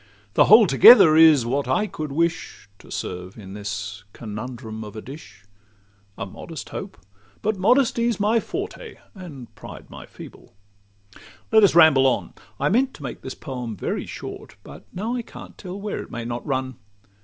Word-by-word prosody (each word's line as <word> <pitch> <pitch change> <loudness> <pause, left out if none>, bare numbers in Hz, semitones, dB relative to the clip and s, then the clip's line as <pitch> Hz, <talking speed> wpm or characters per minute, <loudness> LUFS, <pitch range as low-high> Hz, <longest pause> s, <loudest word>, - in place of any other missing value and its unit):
The - - +5
whole 215 +2 +8
together 155 - +8
is 155 -6 +6
what 140 +4 -1
I 215 - +1
could 155 -7 -6
wish 165 - -2
To - - -17
serve 90 +2 -6
in 95 -3 -10
this 100 0 -6
conundrum 110 0 -7
of 105 -1 -10
a 110 - -6
dish. 135 -3 -12 0.7
A - - -4
modest 155 - -9
hope—but 100 - -7
modesty 235 +2 +2
's 225 - -5
my 215 +3 +2
forte, - - -6 0.2
And 160 - -11
pride - - -12
my - - -11
feeble:—let 100 - -5
us 195 - +4
ramble 155 -6 +6
on. 130 - -1 0.3
I - - +1
meant 260 +6 +1
to 145 - -12
make 130 - -7
this 130 - -7
poem 125 -7 -6
very - - -4
short, - - -9
But - - -13
now 215 +6 -4
I 245 - -2
can't - - -12
tell 185 0 -8
where 205 0 -4
it - - -11
may 120 -1 -6
not 120 0 -5
run. 130 -2 -3
135 Hz, 165 wpm, -23 LUFS, -, 0.7 s, whole